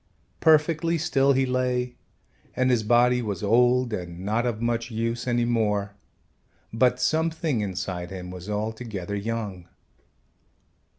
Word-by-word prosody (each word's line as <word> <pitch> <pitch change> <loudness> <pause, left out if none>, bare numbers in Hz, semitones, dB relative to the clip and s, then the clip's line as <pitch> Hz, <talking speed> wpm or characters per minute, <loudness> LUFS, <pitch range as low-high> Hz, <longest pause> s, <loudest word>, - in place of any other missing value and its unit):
Perfectly 160 +1 +3
still 140 -4 +2
he 135 0 +2
lay 125 -1 -1 0.6
and 130 0 +2
his 120 -3 +3
body 120 +3 +3
was 105 -5 -4
old 125 +3 +3
and 90 -3 -5
not 115 +4 0
of 115 -3 -2
much 115 0 -1
use 115 +1 -2
any 120 -1 +1
more, 105 -4 0 0.8
but 125 +2 +3
something 160 -1 0
inside 90 -3 -4
him 90 -1 -7
was 90 +2 -8
altogether 105 -2 -4
young. 100 -4 -4
115 Hz, 125 wpm, -25 LUFS, 105-125 Hz, 0.8 s, Perfectly